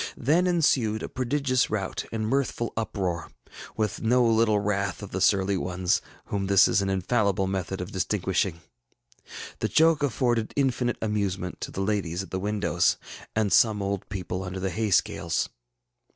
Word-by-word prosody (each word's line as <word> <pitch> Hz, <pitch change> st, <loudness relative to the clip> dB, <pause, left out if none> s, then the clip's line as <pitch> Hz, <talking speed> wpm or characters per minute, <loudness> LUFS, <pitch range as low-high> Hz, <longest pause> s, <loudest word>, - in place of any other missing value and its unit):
Then 170 Hz, +7 st, +2 dB
ensued 130 Hz, -11 st, +2 dB
a -, -, -3 dB
prodigious 130 Hz, 0 st, 0 dB
rout 95 Hz, -3 st, -3 dB
and 110 Hz, -1 st, -2 dB
mirthful 125 Hz, -2 st, -1 dB
uproar, 95 Hz, -6 st, -2 dB, 0.5 s
with 110 Hz, -3 st, -1 dB
no 120 Hz, +2 st, +3 dB
little 110 Hz, -2 st, +3 dB
wrath 100 Hz, -1 st, -1 dB
of 100 Hz, -, -8 dB
the 95 Hz, -, -3 dB
surly 95 Hz, 0 st, +3 dB
ones, 90 Hz, 0 st, 0 dB, 0.2 s
whom 100 Hz, -1 st, -2 dB
this 100 Hz, -1 st, +6 dB
is -, -, +2 dB
an 95 Hz, -, -1 dB
infallible 95 Hz, 0 st, +1 dB
method 95 Hz, -1 st, -3 dB
of 90 Hz, +3 st, -6 dB
distinguishing. 95 Hz, -2 st, -1 dB, 1.0 s
The -, -, 0 dB
joke 160 Hz, -1 st, +4 dB
afforded 120 Hz, -4 st, 0 dB
infinite 125 Hz, -3 st, +1 dB
amusement 100 Hz, -4 st, -2 dB
to -, -, -4 dB
the 95 Hz, -, -4 dB
ladies 95 Hz, -3 st, -1 dB
at -, -, -13 dB
the 95 Hz, -, -2 dB
windows 95 Hz, -3 st, +1 dB, 0.4 s
and 110 Hz, -2 st, +1 dB
some 110 Hz, -3 st, +4 dB
old 100 Hz, -1 st, -3 dB
people 95 Hz, -1 st, -4 dB
under 95 Hz, 0 st, -5 dB
the 95 Hz, 0 st, -2 dB
hay 110 Hz, +5 st, -1 dB
scales. 90 Hz, -, +1 dB
100 Hz, 160 wpm, -26 LUFS, 95-115 Hz, 1.0 s, this